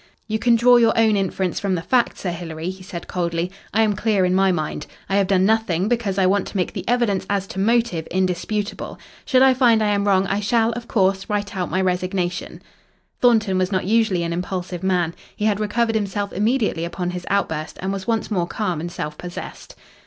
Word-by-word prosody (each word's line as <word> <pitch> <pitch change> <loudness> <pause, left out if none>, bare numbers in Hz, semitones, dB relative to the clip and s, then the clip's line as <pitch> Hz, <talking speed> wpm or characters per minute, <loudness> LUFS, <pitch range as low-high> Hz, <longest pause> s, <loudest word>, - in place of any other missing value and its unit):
"You 220 -1 -1
can 235 +1 +4
draw 245 +1 +6
your 230 -1 +3
own 220 -2 +4
inference 190 -2 -1
from 195 -2 0
the 165 - -4
facts, 245 +2 +1
Sir 180 - -2
Hilary," 165 0 -5
he 190 0 -12
said 180 -2 -8
coldly. 170 0 -2 0.2
"I 225 +2 +3
am 215 -1 +2
clear 210 -2 +1
in 180 - +1
my 190 0 +4
mind. 155 -3 -3 0.2
I 195 - +1
have 195 -2 +2
done 190 -1 +3
nothing, 205 -4 +1
because 220 -5 -1
I 190 - +3
want 195 +1 +2
to - - -5
make 180 - -1
the - - -5
evidence 235 -5 +1
as 200 -1 0
to 190 - -7
motive 225 -6 +1
indisputable. 190 +3 -2 0.3
Should 260 -2 +4
I 265 -1 +6
find 235 -4 +4
I 210 - +2
am 200 0 0
wrong 195 -1 +3
I 195 +1 -1
shall, 225 +2 +2
of 235 0 -6
course, 195 -2 +1
write 205 0 -2
out 180 -2 -2
my 185 - 0
resignation." 180 -1 -2 0.6
Thornton 220 -6 +3
was 185 +1 0
not 185 -2 0
usually 210 -4 +2
an 170 0 -2
impulsive 180 0 -4
man. 180 -3 +1 0.2
He 210 - -2
had 210 -2 +2
recovered 225 +2 0
himself 205 -1 -2
immediately 210 -4 0
upon 175 +1 -3
his 180 0 -7
outburst 160 -6 -1
and 190 +1 -2
was 195 -1 -5
once 225 -1 -1
more 175 -4 0
calm 180 -6 -2
and 175 +1 -5
self 150 -2 -5
possessed. 175 0 -8
195 Hz, 215 wpm, -21 LUFS, 180-220 Hz, 0.6 s, draw